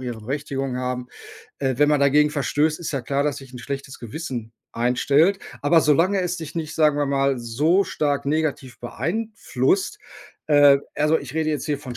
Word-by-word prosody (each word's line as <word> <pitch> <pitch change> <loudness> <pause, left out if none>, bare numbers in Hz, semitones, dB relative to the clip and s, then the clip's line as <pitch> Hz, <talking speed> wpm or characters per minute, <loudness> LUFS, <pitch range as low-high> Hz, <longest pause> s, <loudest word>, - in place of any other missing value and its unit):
ihre 120 -3 -5
Berechtigung 135 +1 -3
haben 125 0 -3 0.5
äh, 135 -2 0
wenn 145 0 +4
man 150 -1 +3
dagegen 150 +2 +4
verstößt, 150 +2 0
ist 160 - -4
ja 140 - -1
klar, 140 +4 -1
dass 145 -1 -1
sich 135 -2 -13
'n 125 - -8
schlechtes 135 +1 -6
Gewissen 120 -2 -6 0.2
einstellt, 140 +10 +2 0.2
aber 165 +3 +5
solange 170 +7 +3
es 180 0 -2
dich 160 0 -8
nicht, 160 -1 -4
sagen 150 -2 +3
wir 145 - +1
mal 135 -1 +1
so 150 +11 +2
stark 145 -2 -1
negativ 145 -4 -2
beeinflusst 190 - -1 0.5
äh, 145 -2 +6 0.2
also, 150 +2 +2
ich 140 +1 -9
rede 160 -1 0
jetzt 150 - -3
hier 150 -2 0
von 125 -4 -8
145 Hz, 180 wpm, -23 LUFS, 130-155 Hz, 0.5 s, äh